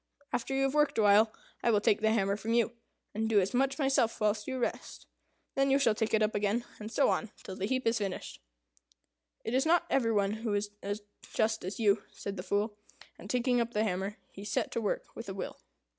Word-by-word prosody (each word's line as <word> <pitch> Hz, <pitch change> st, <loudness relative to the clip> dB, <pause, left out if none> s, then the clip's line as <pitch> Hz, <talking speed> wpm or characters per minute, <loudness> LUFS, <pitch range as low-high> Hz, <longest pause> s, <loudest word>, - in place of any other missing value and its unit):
After 270 Hz, +3 st, -1 dB
you 270 Hz, -, +2 dB
have 270 Hz, 0 st, +1 dB
worked 295 Hz, -1 st, +2 dB
awhile, 215 Hz, +1 st, +5 dB, 0.3 s
I -, -, +2 dB
will 215 Hz, -3 st, +4 dB
take 205 Hz, 0 st, +2 dB
the 220 Hz, -, +3 dB
hammer 200 Hz, -3 st, +2 dB
from 220 Hz, +3 st, -2 dB
you, 235 Hz, -1 st, +3 dB, 0.4 s
and 220 Hz, +1 st, -1 dB
do 215 Hz, -2 st, +5 dB
as 190 Hz, 0 st, 0 dB
much 270 Hz, +2 st, +2 dB
myself 270 Hz, -5 st, +2 dB
whilst 210 Hz, 0 st, +1 dB
you 260 Hz, -, -2 dB
rest. 245 Hz, -, -3 dB, 0.5 s
Then 275 Hz, 0 st, +2 dB
you 270 Hz, -, +5 dB
shall 240 Hz, -6 st, +3 dB
take 220 Hz, +1 st, 0 dB
it 220 Hz, -, +3 dB
up 215 Hz, -, +1 dB
again, 210 Hz, +3 st, 0 dB
and 215 Hz, +1 st, -7 dB
so 280 Hz, -, +3 dB
on 225 Hz, -, -1 dB
till 190 Hz, -, -7 dB
the 195 Hz, -, -2 dB
heap 260 Hz, +2 st, -1 dB
is 230 Hz, 0 st, +2 dB
finished." 195 Hz, -, -4 dB, 1.0 s
"It 225 Hz, -, -2 dB
is 260 Hz, +1 st, +3 dB
not 340 Hz, +2 st, +3 dB
every 235 Hz, -4 st, +3 dB
one 200 Hz, -2 st, +2 dB
who 220 Hz, -3 st, 0 dB
is 205 Hz, 0 st, -1 dB
as 205 Hz, +1 st, -4 dB, 0.3 s
just 220 Hz, 0 st, +1 dB
as 190 Hz, +7 st, -5 dB
you," 205 Hz, -2 st, +3 dB
said 200 Hz, -1 st, -5 dB
the 180 Hz, -, -4 dB
Fool; 205 Hz, +3 st, -1 dB, 0.4 s
and 200 Hz, -, -10 dB
taking 245 Hz, 0 st, +2 dB
up 235 Hz, 0 st, -3 dB
the 210 Hz, -, +3 dB
hammer, 195 Hz, 0 st, -2 dB
he 195 Hz, -, -10 dB
set 205 Hz, -, -1 dB
to 230 Hz, -, -1 dB
work 210 Hz, -, -1 dB
with 230 Hz, -2 st, -7 dB
a 190 Hz, -, -5 dB
will. 195 Hz, -, -5 dB
220 Hz, 230 wpm, -31 LUFS, 205-240 Hz, 1.0 s, awhile